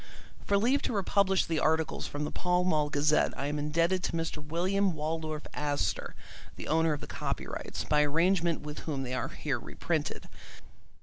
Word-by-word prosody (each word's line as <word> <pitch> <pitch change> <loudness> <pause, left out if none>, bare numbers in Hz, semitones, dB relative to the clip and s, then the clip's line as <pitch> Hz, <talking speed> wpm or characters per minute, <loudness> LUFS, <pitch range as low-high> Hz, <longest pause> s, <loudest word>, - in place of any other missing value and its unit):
For 200 - +4
leave 250 +7 +3
to - - -1
republish 195 -1 +2
the 160 -2 0
articles 160 +1 +1
from 145 +1 -4
the 150 - -2
Pall 180 0 +1
Mall 155 -5 +2
Gazette 150 +1 +2
I 135 - -2
am 145 +1 -1
indebted 165 +5 +1
to - - -2
Mr. 165 -2 -2
William 185 +5 +1
Waldorf 155 0 -3
Astor, 145 -1 -1 0.4
the - - -7
owner 160 0 +3
of 145 - -4
the - - -6
copyrights, - - -4
by 150 0 +3
arrangement 170 +3 +2
with 150 0 -6
whom 140 -4 -3
they 130 -1 -4
are 130 - -1
here - - -2
reprinted. - - -3
160 Hz, 175 wpm, -30 LUFS, 150-180 Hz, 0.4 s, For